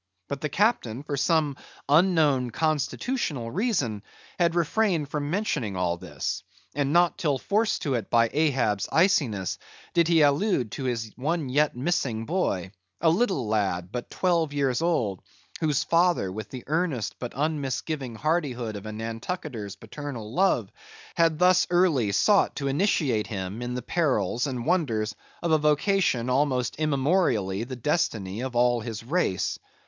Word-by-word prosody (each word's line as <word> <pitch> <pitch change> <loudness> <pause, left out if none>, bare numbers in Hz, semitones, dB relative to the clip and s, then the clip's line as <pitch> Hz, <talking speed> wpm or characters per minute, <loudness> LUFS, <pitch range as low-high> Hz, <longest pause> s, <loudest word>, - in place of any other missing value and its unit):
But 140 -1 -5
the 150 - -1
captain, 145 - +1
for 145 -1 -3
some 145 0 +1 0.3
unknown 150 -5 +3
constitutional 155 - -1
reason, 160 - 0 0.4
had 170 -1 +2
refrained 170 -2 +1
from 145 -1 -3
mentioning 150 - -1
all 90 -1 0
this, - - -4 0.3
and 140 0 0
not 175 +1 +3
till 145 -5 +1
forced 210 - 0
to 140 -5 0
it 115 -5 -2
by 115 -1 +3
Ahab's 130 -10 +1
iciness 130 - +2 0.3
did 170 -1 +3
he 165 -2 +5
allude 145 - +2
to 135 - -5
his 115 -3 -2
one 150 +1 -1
yet 145 +2 +2
missing 125 -5 -1
boy; 105 - -1 0.3
a 165 -1 +4
little 180 - +1
lad, 95 -4 -1
but 120 +1 -5
twelve 170 -5 +1
years 135 -3 0
old, 120 - 0 0.4
whose 150 -4 +1
father 170 - +2
with 105 +1 -6
the 130 -2 -8
earnest 155 -6 -1
but 125 - -5
unmisgiving 140 -3 -2
hardihood 130 -6 -1
of 100 +1 -7
a - - -4
Nantucketer's 115 - -5
paternal 115 0 -7
love, 190 +6 +2 0.4
had 165 -3 +2
thus 180 +1 +4
early 165 - +3
sought 200 - +3
to 140 - -2
initiate 140 - +1
him 100 +1 -5
in 125 0 -3
the 125 - -4
perils 125 - 0
and 125 -3 -4
wonders 115 - 0 0.3
of 170 - 0
a 155 - +5
vocation 150 - +2
almost 130 -1 +1
immemorially 140 - +1
the 130 +1 -6
destiny 115 - -1
of 130 -1 -4
all 120 0 +3
his 115 -1 -6
race. 130 - 0
140 Hz, 150 wpm, -26 LUFS, 115-165 Hz, 0.4 s, he